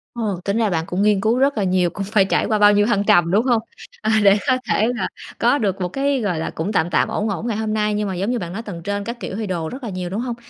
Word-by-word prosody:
Ồ, 210 -6 -2
tính 200 +2 0
ra 225 -2 +2
bạn 165 -3 -1
cũng 185 +1 -2
nghiên 205 -1 +3
cứu 225 +3 +2
rất 275 0 +2
là 205 - +1
nhiều, 180 -1 +2
cũng 195 +4 -5
phải 205 -1 +3
trải - - +1
qua 215 -1 0
bao 205 0 +6
nhiêu 205 0 +3
thăng 205 -3 +1
trầm, 175 -4 +4
đúng 215 +6 +2
hông? 240 -4 +2 0.4
À, 220 - 0
để 200 0 +6
có 255 - +3
thể 215 - +2
là - - -1 0.3
có 285 - +3
được 195 -6 -1
một 180 - 0
cái, 275 +4 0
gọi 180 -7 -1
là, 160 - -3
cũng 165 +6 -4
tạm 175 -5 +1
tạm, 170 - +2
ổn 215 +1 -2
ổn 200 +4 -3
ngày 225 -3 -1
hôm 220 -1 -2
nay. 210 -1 0
Nhưng 210 0 -1
mà 190 - -3
giống 195 +6 -1
như 245 - -1
bạn 175 -3 -6
nói 220 - -4
tầng 200 -7 -8
trên 205 +2 -2
các 235 +3 -6
kiểu 190 - -5
thì 220 0 -3
đồ 170 -4 -3
rất 265 +1 -8
là 235 - -4
nhiều, 180 -2 -4
đúng 200 +5 -3
hông? 245 -1 -3
205 Hz, 320 wpm, -20 LUFS, 185-225 Hz, 0.4 s, bao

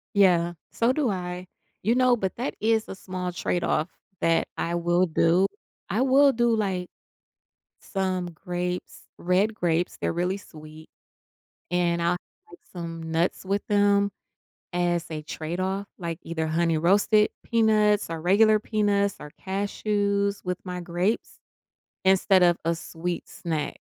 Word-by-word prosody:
Yeah, 175 -3 +4 0.2
so 235 +2 +2
do 265 -3 +1
I, 180 -1 -4 0.4
you 225 +4 +3
know, 255 -1 +4
but 190 -4 -2
that 250 - -3
is 220 0 +1
a - - -6
small 185 -1 -5
trade 175 0 -1
off 160 +4 0 0.3
that 165 0 +2
I 170 - -1
will 175 +1 +2
do, 170 +3 +3 0.4
I - - 0
will 270 +2 +5
do, 240 0 +2
like, 190 -4 -1 0.9
some 185 -2 -2
grapes, 180 +2 -4 0.2
red 190 +5 +2
grapes, 175 -3 0
they're - - 0
really 180 +3 0
sweet, 155 -3 -13 0.8
and 175 -1 +1
I'll 170 +1 +2
have 355 - -10
some 165 -2 -6
nuts 170 +4 0
with 200 +2 -1
them 200 -1 +3 0.6
as 175 -1 0
a 155 -1 -4
trade 160 +3 -5
off 195 +2 -2
like 170 -3 -4
either 160 -1 -3
honey 165 +1 +1
roasted 205 +6 +4
peanuts 215 -4 +3
or 165 -1 -4
regular 215 +5 +5
peanuts 205 -2 +1
or 150 - -9
cashews 200 +1 -1
with 180 -1 -2
my 180 -1 -5
grapes 175 +5 -2 0.7
instead 190 0 +4
of 175 -1 +4
a 170 - +2
sweet 170 +1 -5
snack, 160 -4 -3
180 Hz, 145 wpm, -26 LUFS, 170-205 Hz, 0.9 s, will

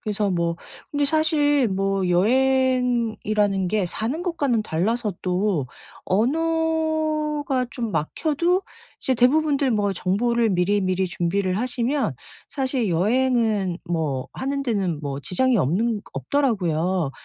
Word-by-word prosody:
그래서 210 -1 -1
뭐 170 -2 0 0.3
근데 290 -1 +1
사실 295 -3 +3
뭐 195 -1 0
여행이라는 235 -3 +1
게 205 -1 0
사는 240 - -3
것과는 285 - 0
달라서 210 +4 -1
또 180 -5 0 0.4
언어가 310 - 0
좀 235 -3 -4
막혀도 310 - 0 0.4
이제 260 - +1
대부분들 280 +2 +3
뭐 205 -3 0
정보를 230 +5 +1
미리미리 185 0 +1
준비를 185 +2 -1
하시면 250 +4 0 0.4
사실 260 -6 -1
여행은 215 -1 +1
뭐 155 -7 -2
하는 275 +1 -2
데는 195 - -1
뭐 140 -2 -4
지장이 250 - +1
없는 205 - 0
없더라고요. 185 - 0
225 Hz, 250 characters per minute, -23 LUFS, 185-270 Hz, 0.4 s, 사실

